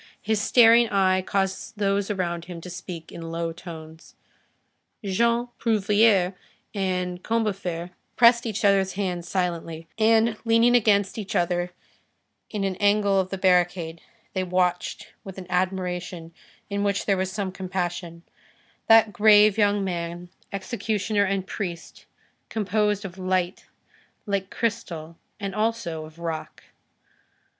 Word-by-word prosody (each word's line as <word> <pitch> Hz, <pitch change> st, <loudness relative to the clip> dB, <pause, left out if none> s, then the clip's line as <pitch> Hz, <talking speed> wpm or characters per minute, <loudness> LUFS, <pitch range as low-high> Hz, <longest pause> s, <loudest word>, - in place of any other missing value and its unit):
His 220 Hz, -1 st, 0 dB
staring 235 Hz, 0 st, +6 dB
eye 190 Hz, -2 st, +3 dB
caused 195 Hz, +3 st, -2 dB
those 200 Hz, 0 st, 0 dB
about 175 Hz, -4 st, -2 dB
him 175 Hz, -1 st, -8 dB
to 180 Hz, -, -8 dB
speak 180 Hz, -2 st, -8 dB
in 165 Hz, -1 st, -7 dB
low 165 Hz, 0 st, -3 dB
tones. 160 Hz, -2 st, -11 dB, 0.9 s
Jean 235 Hz, +5 st, +1 dB
Prouvaire 205 Hz, -3 st, +3 dB, 0.4 s
and 180 Hz, -3 st, -2 dB
Combeferre 190 Hz, -6 st, -2 dB, 0.2 s
pressed 235 Hz, 0 st, +5 dB
each 220 Hz, -1 st, -2 dB
other's 195 Hz, -1 st, +3 dB
hands 180 Hz, -3 st, -3 dB
silently, 165 Hz, -3 st, -3 dB
and, 225 Hz, 0 st, +3 dB
leaning 230 Hz, +1 st, +4 dB
against 205 Hz, -3 st, +2 dB
each 200 Hz, -2 st, -5 dB
other 175 Hz, 0 st, +1 dB, 0.8 s
in 210 Hz, -2 st, -3 dB
an 190 Hz, -2 st, -1 dB
angle 205 Hz, -1 st, +3 dB
of 185 Hz, -1 st, -1 dB
the 195 Hz, -, -4 dB
barricade, 175 Hz, -3 st, +1 dB, 0.3 s
they 185 Hz, -, -1 dB
watched 180 Hz, -1 st, -1 dB
with 195 Hz, -1 st, -9 dB
an 190 Hz, -, -7 dB
admiration 180 Hz, -2 st, -2 dB, 0.3 s
in 200 Hz, 0 st, -2 dB
which 200 Hz, -1 st, 0 dB
there 200 Hz, -, +3 dB
was 190 Hz, 0 st, -2 dB
some 200 Hz, -2 st, -3 dB
compassion, 175 Hz, -2 st, -4 dB, 0.6 s
that 225 Hz, -1 st, +6 dB
grave 210 Hz, -1 st, +6 dB
young 205 Hz, -2 st, +2 dB
man, 175 Hz, -1 st, -4 dB, 0.2 s
executioner 205 Hz, 0 st, -1 dB
and 195 Hz, -1 st, -1 dB
priest, 175 Hz, -5 st, -6 dB, 0.4 s
composed 210 Hz, -1 st, 0 dB
of 190 Hz, 0 st, -8 dB
light, 185 Hz, 0 st, -1 dB, 0.6 s
like 200 Hz, -2 st, -2 dB
crystal, 170 Hz, -9 st, -4 dB, 0.2 s
and 200 Hz, -2 st, -4 dB
also 215 Hz, -7 st, -2 dB
of 155 Hz, +1 st, -15 dB
rock. 165 Hz, -2 st, -5 dB
190 Hz, 130 wpm, -25 LUFS, 175-210 Hz, 0.9 s, staring